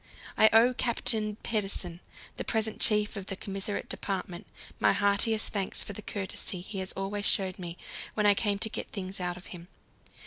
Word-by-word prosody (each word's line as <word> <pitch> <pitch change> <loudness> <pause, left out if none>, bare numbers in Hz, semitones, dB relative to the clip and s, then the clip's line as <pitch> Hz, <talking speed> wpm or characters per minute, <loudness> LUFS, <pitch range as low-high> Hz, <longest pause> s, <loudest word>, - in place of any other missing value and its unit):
I 220 - +7
owe 230 +3 +6
Captain 225 -3 +1
Pedersen, 195 -5 -1 0.4
the - - -2
present 220 -1 -1
chief 210 -1 +3
of 195 -2 -6
the 195 - -3
Commissariat 195 +1 -3
Department, 185 -1 -4 0.3
my - - +5
heartiest 205 +2 +3
thanks 195 -3 -1
for 205 - -7
the 215 - -7
courtesy 190 -2 -4
he 190 +1 -4
always 200 +1 -2
showed 190 -2 +1
me 175 -1 -6 0.4
when 210 - +1
I 205 - +8
came 205 0 +1
to 220 +2 -1
get - - -4
things 190 -2 -3
out 175 -1 -2
of 180 - -11
him. 175 -1 -10
200 Hz, 175 wpm, -30 LUFS, 190-215 Hz, 0.4 s, I